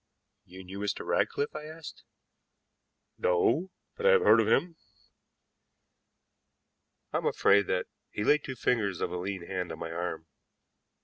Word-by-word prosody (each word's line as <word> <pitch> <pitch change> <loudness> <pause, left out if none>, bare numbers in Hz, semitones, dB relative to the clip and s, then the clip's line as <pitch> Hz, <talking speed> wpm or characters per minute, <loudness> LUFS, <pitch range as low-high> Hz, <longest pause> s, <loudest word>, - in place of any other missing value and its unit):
"You 95 +1 -11
knew 95 +2 -8
Mr. 105 0 -3
Ratcliffe?" 145 - 0
I 150 - -6
asked. 155 0 -10 1.1
"No, 120 - +2 0.3
but 470 +1 0
I - - +8
have 470 -2 +5
heard - - +7
of - - -1
him." 170 -1 +2 2.4
"I - - +2
am - - -1
afraid 100 -1 +4
that 90 - 0 0.2
" - - -52
He 105 - -3
laid 150 +5 +3
two 130 - -5
fingers 105 -6 0
of - - -2
a 90 - -3
lean 95 -1 -4
hand 90 -2 -4
on 80 - -6
my 80 0 -6
arm. 85 -1 -4
100 Hz, 160 wpm, -29 LUFS, 90-150 Hz, 2.4 s, I